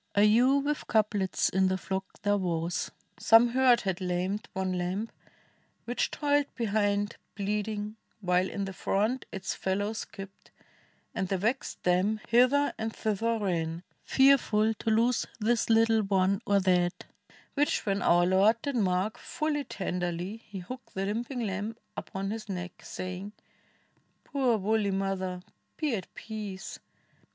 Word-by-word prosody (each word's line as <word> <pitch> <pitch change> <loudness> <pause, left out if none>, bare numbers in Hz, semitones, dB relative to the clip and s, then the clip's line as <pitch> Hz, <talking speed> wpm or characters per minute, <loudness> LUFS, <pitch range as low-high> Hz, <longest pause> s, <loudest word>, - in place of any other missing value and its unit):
A 200 - +5
ewe 250 +7 +5
"v^dth 295 +1 -2
couplets 210 -4 +1
in 190 0 +2
the 185 0 +1
flock 190 +1 -5
there 205 0 +2
was. 170 -1 -1 0.3
Some 225 +2 +6
hurt 250 -1 +4
had 190 -1 -2
lamed 185 +3 -1
one 190 -1 -1
lamb, 185 +5 -2 0.7
which 245 +1 0
toiled 290 -1 +1
behind 205 -2 0 0.2
Bleeding, 210 +1 -2 0.2
while 180 -1 +1
in 200 - -3
the 195 - -6
front 215 +8 0
its 190 -1 -3
fellow 205 +3 -1
skipped, 200 -3 -9 0.6
And 190 - -1
the 195 - 0
vexed 230 +8 -2
dam 185 +5 +2
hither 255 +4 +4
and 220 0 -2
thither 225 +2 0
ran, 170 -4 -2 0.2
Fearful 240 -5 +4
to 225 - -3
lose 230 +2 +2
this 230 +2 +1
little 225 0 +4
one 195 -1 +2
or 200 0 +4
that; 180 -1 +1 0.5
Which 290 +1 +1
when 200 -1 0
our 175 0 +4
Lord 195 +5 +4
did 285 -2 -2
mark, 195 +2 0
full 305 -1 -2
tenderly 180 0 -3
He 200 -4 -9
took 255 +7 -9
the 190 0 -2
limping 240 +5 -2
lamb 210 +1 -3 0.2
upon 195 +1 -4
his 220 -1 -6
neck, 180 -2 -5
Sa}dng, 185 +3 -6 0.9
"Poor 260 -5 +1
woolly 210 +1 +1
mother, 190 -2 -2 0.3
be 305 -5 0
at 190 -5 -4
peace! 210 -4 -6
205 Hz, 145 wpm, -29 LUFS, 190-225 Hz, 0.9 s, Some